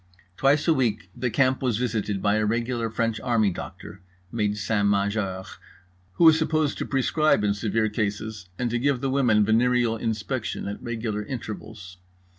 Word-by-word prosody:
Twice 145 Hz, -, +2 dB
a 165 Hz, -, +6 dB
week 115 Hz, -7 st, -1 dB
the 125 Hz, -, -1 dB
camp 130 Hz, +3 st, +2 dB
was 125 Hz, -5 st, 0 dB
visited 110 Hz, -4 st, -2 dB
by 105 Hz, +1 st, +3 dB
a 110 Hz, -, +1 dB
regular 115 Hz, +1 st, -1 dB
French 115 Hz, 0 st, -1 dB
army 110 Hz, -5 st, +2 dB
doctor 85 Hz, -, -9 dB, 0.3 s
(médecin 105 Hz, -1 st, 0 dB
major) 100 Hz, -2 st, 0 dB, 0.7 s
who -, -, +1 dB
was 160 Hz, -1 st, +7 dB
supposed 155 Hz, -2 st, 0 dB
to -, -, -3 dB
prescribe 140 Hz, -2 st, +2 dB
in 100 Hz, -1 st, +2 dB
severe 110 Hz, +2 st, 0 dB
cases 105 Hz, -1 st, -3 dB
and 120 Hz, -2 st, -1 dB
to 120 Hz, -, 0 dB
give 135 Hz, -1 st, +1 dB
the 135 Hz, -, -1 dB
women 120 Hz, -6 st, +3 dB
venereal 120 Hz, +1 st, +2 dB
inspection 115 Hz, +1 st, -3 dB
at 100 Hz, -, -5 dB
regular 115 Hz, -3 st, -3 dB
intervals. 105 Hz, -5 st, -7 dB
115 Hz, 160 wpm, -25 LUFS, 105-125 Hz, 0.7 s, was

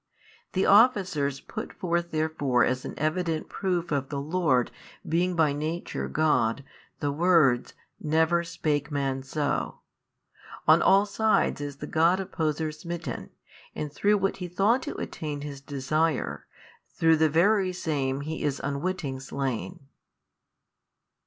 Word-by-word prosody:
The 190 Hz, -, +1 dB
officers 195 Hz, -, +4 dB
put -, -, -6 dB
forth 170 Hz, -1 st, -2 dB
therefore 155 Hz, -6 st, +1 dB
as 130 Hz, 0 st, -1 dB
an -, -, -6 dB
evident 160 Hz, +1 st, -1 dB
proof 175 Hz, -3 st, -2 dB
of 140 Hz, -2 st, -1 dB
the 140 Hz, -, -3 dB
Lord 145 Hz, -5 st, +1 dB, 0.3 s
|557 -, -, -8 dB
being 175 Hz, +2 st, +1 dB
by 155 Hz, -4 st, +3 dB
Nature 155 Hz, +4 st, -3 dB
God, 140 Hz, -5 st, +1 dB, 0.4 s
the 145 Hz, -, -1 dB
words 155 Hz, -6 st, +3 dB, 0.2 s
Never 160 Hz, +2 st, +2 dB
spake 155 Hz, -3 st, -2 dB
man 135 Hz, -2 st, -1 dB
so. 145 Hz, +2 st, -2 dB, 0.9 s
On -, -, +7 dB
all 195 Hz, +2 st, +5 dB
sides 215 Hz, -6 st, +1 dB
is 145 Hz, -1 st, -5 dB
the 145 Hz, -, -7 dB
God 165 Hz, +5 st, +3 dB
opposer 160 Hz, -4 st, -2 dB
smitten, 170 Hz, +2 st, -6 dB, 0.5 s
and 150 Hz, -1 st, -4 dB
through 205 Hz, +5 st, +3 dB
what 195 Hz, 0 st, -1 dB
he 180 Hz, -, -5 dB
thought 200 Hz, +8 st, +2 dB
to -, -, -5 dB
attain 150 Hz, -2 st, -5 dB
his 140 Hz, -2 st, -7 dB
desire, 145 Hz, +2 st, -1 dB, 0.4 s
through 165 Hz, -1 st, +3 dB
the 160 Hz, 0 st, +3 dB
very 185 Hz, +4 st, +3 dB
same 140 Hz, -6 st, -2 dB
is 150 Hz, -2 st, -2 dB
he -, -, -10 dB
unwitting 140 Hz, -1 st, -3 dB
slain. 130 Hz, -7 st, -4 dB
155 Hz, 135 wpm, -27 LUFS, 140-175 Hz, 0.9 s, On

